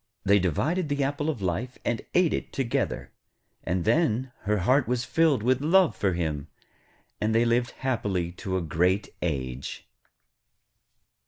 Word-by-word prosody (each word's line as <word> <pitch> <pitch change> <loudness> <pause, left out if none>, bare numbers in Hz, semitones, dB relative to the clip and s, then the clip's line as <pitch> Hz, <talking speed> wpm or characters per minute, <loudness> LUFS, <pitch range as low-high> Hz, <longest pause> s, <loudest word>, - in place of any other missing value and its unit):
They 100 +1 +5
divided 150 - 0
the 145 -1 0
apple 145 +2 -1
of 120 -11 -3
life, 105 +9 -2
and 120 - 0
ate 180 -3 +4
it - - -3
together, 130 -4 -2 0.5
and 90 -1 -1
then 130 -5 +2
her 105 +1 +2
heart 125 +8 +3
was 125 0 0
filled 155 -9 +2
with 130 +2 +2
love 165 - +4
for 95 -1 0
him, 80 -4 -2 0.7
and 110 +1 +1
they 115 +1 +4
lived 120 +1 +2 0.2
happily 100 -9 0
to 95 +1 -3
a 90 - -2
great 90 +6 +1
age. 65 -5 -4
115 Hz, 150 wpm, -27 LUFS, 90-135 Hz, 0.7 s, They